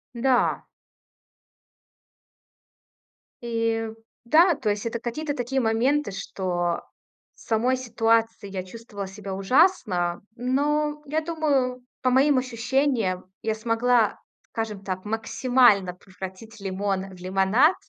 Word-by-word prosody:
Да. 250 +1 +2 2.8
И, 230 -1 -1 0.4
да, 330 +7 +5
то 255 -7 -2
есть 205 +1 -1
это 230 0 -2
какие-то 290 +6 -3
такие 265 +1 -1
моменты, 240 +3 +1
что 180 -3 -2 0.5
в - - -24
самой 240 +3 +1
ситуации 225 -3 +1
я 190 -1 -4
чувствовала 205 0 -8
себя 195 0 -7
ужасно, 195 - +2
но 295 +4 0
я 305 +2 -1
думаю, 285 -6 0 0.2
по 255 - +2
моим 270 +2 +4
ощущениям, 250 -5 0 0.2
я 220 -1 -1
смогла, 230 0 +2 0.3
скажем 215 -3 -4
так, 185 0 -4
максимально 225 -3 +3
превратить 190 +4 -10
лимон 195 0 -2
в - - -15
лимонад. 195 - +3
230 Hz, 105 wpm, -25 LUFS, 195-260 Hz, 2.8 s, да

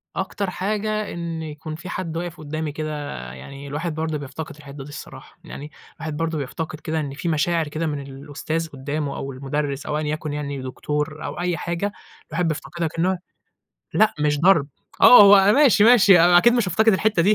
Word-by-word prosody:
أكتر 190 0 -3
حاجة 215 +3 -2
إن 170 -1 -5
يكون 155 0 -7
في 170 +3 -9
حد 165 -3 -4
واقف 175 0 -5
قدامي 155 0 -4
كده 150 -1 -5 0.2
يعني، 140 - -10
الواحد 155 +3 -4
برضه 160 -1 -2
بيفتقد 145 +3 -7
الحتّة 140 -1 -10
دي 145 - -11
الصراحة 145 - -11
يعني، 150 +2 -9 0.2
الواحد 155 -2 -6
برضه 165 -1 -1
بيفتقد 155 +3 -5
كده 160 0 -3
إن 140 -2 -4
في 165 +4 -3
مشاعر 160 0 +1
كده 160 +2 -3
من 145 -2 -3
الأُستاذ 145 +4 -5
قدامه 145 +1 -4
أو 135 - -5
المُدرّس 140 +2 -3
أو 150 -1 -2
أيًا 155 -1 -2
يكن 155 -1 -4
يعني، 140 -2 -4
دكتور 150 +4 -4
أو - - -5
أي 175 -2 -1
حاجة، 170 +5 -2 0.4
الواحد 165 +2 -1
بيفتقدها 165 +2 -3
كأنه 175 +4 0 0.8
لأ 215 - +4
مش 150 -1 +1
ضرب، 165 -5 +4 0.3
آه 245 - +10
هو 200 0 +7
ماشي، 245 -8 +5
ماشي 205 -7 +7
أنا 175 +1 +6
أكيد 240 +6 +5
مش 235 -6 +1
هأفتقد 220 +6 +3
الحتّة 205 -2 +2
دي 205 +4 +4
160 Hz, 185 wpm, -22 LUFS, 145-180 Hz, 0.8 s, آه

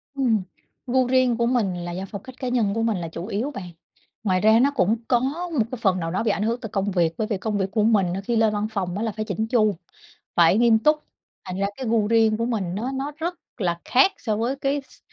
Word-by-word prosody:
Ừm, 240 -6 +2 0.5
gu 255 0 +2
riêng 255 -2 +3
của 235 - +1
mình 235 -7 +1
là 175 - -4
do 185 +2 -4
phong 200 - -6
cách 260 - -11
cá 255 - -3
nhân 230 -5 +1
của 225 - -1
mình 225 -3 +1
là 170 -2 -4
chủ 165 +2 -6
yếu 230 +7 -2
bạn. 185 -8 -7 0.5
Ngoài 185 -3 +1
ra 220 +2 +5
nó 275 +3 +4
cũng 215 -1 +3
có 245 - +3 0.4
một 215 - +3
cái 255 - -5
phần 190 -3 +2
nào 165 -1 -3
đó 190 +5 -1
bị 215 - +2
ảnh 205 - -1
hưởng 230 +2 0
từ 225 - -6
công 200 0 -1
việc 170 -3 +1
bởi 215 - -1
vì 210 -3 -1
công 210 +1 -2
việc 190 -1 -1
của 215 +1 +1
mình 200 -5 +3
á 195 - -3
khi 235 +4 -2
lên 220 -1 +3
văn 210 +1 -1
phòng 190 -4 -2
á 215 - -2
là 225 - -1
phải 215 +1 -4
chỉn 215 +1 -2
chu, 215 -4 +2 0.6
phải 175 +4 +5
nghiêm 230 -2 +5
túc, 300 +7 +4 0.5
thành 185 0 -5
ra 200 - +1
cái 260 - -5
gu 220 -2 +2
riêng 225 -1 +4
của 230 - -1
mình 200 -7 -2
nó 235 +7 -2
nó 275 +2 -3
rất 340 +3 -3 0.2
là 175 -5 -1
khác 270 +10 +4
so 215 -3 -1
với 240 +5 -1
cái 280 +1 -1
s - - -20
220 Hz, 270 wpm, -24 LUFS, 195-240 Hz, 0.6 s, ra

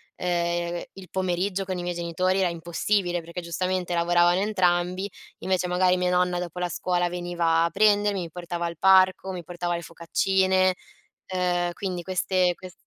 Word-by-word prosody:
ehm, 175 -1 -1
il 190 -2 -12
pomeriggio 185 +1 -1
con 185 -1 -4
i 175 - -4
miei 175 0 -2
genitori 180 +2 0
era 185 -2 +2
impossibile 175 +2 -1
perché 170 +2 -7
giustamente 180 +1 -2
lavoravano 175 +1 +3
entrambi. 185 -2 +1 0.4
Invece 185 -1 0
magari 180 +1 +3
mia 180 0 +1
nonna 180 0 +1
dopo 180 -1 -6
la 180 - 0
scuola 175 0 0
veniva 175 -2 0
a - - 0
prendermi, 205 -1 +3
mi 170 -2 -6
portava 175 0 -4
al 170 -1 -4
parco, 190 0 +4
mi 180 -2 -6
portava 175 +1 -3
le 170 - -5
focaccine, 185 +3 +1 0.5
ehm, 180 -1 0
quindi 180 -1 -4
queste 185 0 +1
quest 185 -1 -11
180 Hz, 165 wpm, -25 LUFS, 175-185 Hz, 0.5 s, parco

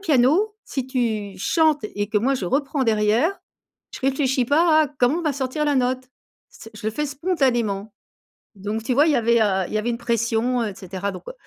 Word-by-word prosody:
piano, 320 - +2
si 265 -2 -4
tu 220 -7 -2
chantes 310 - +2
et 205 0 -2
que 210 0 +1
moi, 265 +5 +1
je 230 - -3
reprends 275 - 0
derrière, 225 - +2 0.6
je - - -8
réfléchis 265 -1 +1
pas 315 +2 +4
à 300 - -1
comment 265 +2 +1
on - - -6
va 305 -3 0
sortir 270 +2 -2
la 290 -2 +1
note. 255 0 0 0.4
C'est 225 - -13
Je 215 - -7
le 220 - -1
fais 300 +6 -2
spontanément!». 250 - -1 0.6
Donc, 210 +3 -4
tu 250 +2 0
vois, 290 +4 +5
il - - +4
y - - +3
avait, 235 0 +3
heu, 190 -3 +1
il - - -9
y 215 - +1
avait 215 +3 -1
une 235 - -3
pression, 235 +1 0
et 205 - -4
cetera, 190 +2 -5
donc, 185 - -9
heu - - -8
250 Hz, 215 wpm, -22 LUFS, 215-285 Hz, 0.6 s, vois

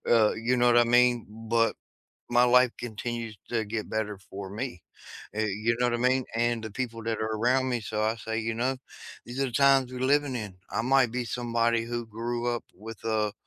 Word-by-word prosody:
uh, 110 -2 +5
you 115 +3 0
know 120 0 +3
what 120 0 +6
I 120 - +6
mean? 120 0 +4 0.2
But 115 -1 +3 0.5
my 120 0 +5
life 125 0 +5
continues 115 -1 -5
to 115 -2 0
get 110 +1 -4
better 105 -2 -2
for 95 0 -7
me, 105 -3 -5 0.5
eh, 110 +1 0
you 110 +3 0
know 125 - +3
what 120 - 0
I - - -2
mean? 130 +2 +2
And 120 -1 +1
the 110 - -5
people 115 -1 -4
that 115 0 -1
are 110 0 -1
around 130 +4 +2
me, 120 -2 -1
so 105 0 -3
I 110 +1 +1
say, 110 0 -3
you 115 0 -2
know, 125 +3 -1 0.5
"These 120 +2 -6
are - - +3
the - - -6
times 135 0 +4
we're 125 - -5
living 140 0 +2
in." 105 -5 -5
I - - -1
might 130 -1 +4
be 125 0 -2
somebody 115 -1 0
who 120 0 -3
grew 120 +2 -3
up 120 - -4
with 110 +2 -10
a 110 -2 0
115 Hz, 220 wpm, -28 LUFS, 110-125 Hz, 0.5 s, what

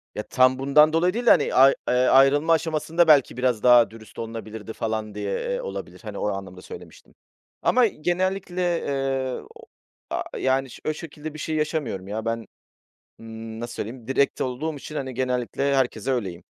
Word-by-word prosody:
Ya, 105 - -3
tam 130 0 +3
bundan 150 +3 +5
dolayı 175 +3 +2
değil 240 +2 -3
de, - - +6
hani, - - +4
ay 135 +1 +7
eee, - - +2
ayrılma 135 +5 +4
aşamasında 160 +1 +1
belki 140 -5 +5
biraz 125 -4 0
daha 120 -3 +6
dürüst 110 -1 -13
olunabilirdi 110 -1 -7
falan 110 -2 -3
diye, 100 -1 -3
eee, - - -2
olabilir. 480 - -7
Hani, 105 -2 -7
o - - -1
anlamda 95 -2 -6
söylemiştim. - - -12 0.5
Ama 250 -1 +4
genellikle, 185 +2 -2 0.2
eee, 135 -2 -2
o - - -14 0.4
a - - -2
yani, 130 0 0
ş - - -12
o 155 - +1
şekilde 155 -1 -8
bir 155 - -9
şey 155 +1 -3
yaşamıyorum 150 - -2
ya. 110 +2 -4
Ben, 115 0 -3 0.7
ııı, 110 0 -8
nasıl 120 - -6
söyleyeyim, 115 +2 -6
direkt 135 +2 +1
olduğum 140 +5 -2
için, 150 +2 -8
hani, 130 -2 -4
genellikle 130 +2 -1
herkese 130 -2 0
öyleyim. 95 -9 -3
130 Hz, 175 wpm, -24 LUFS, 115-155 Hz, 0.7 s, ay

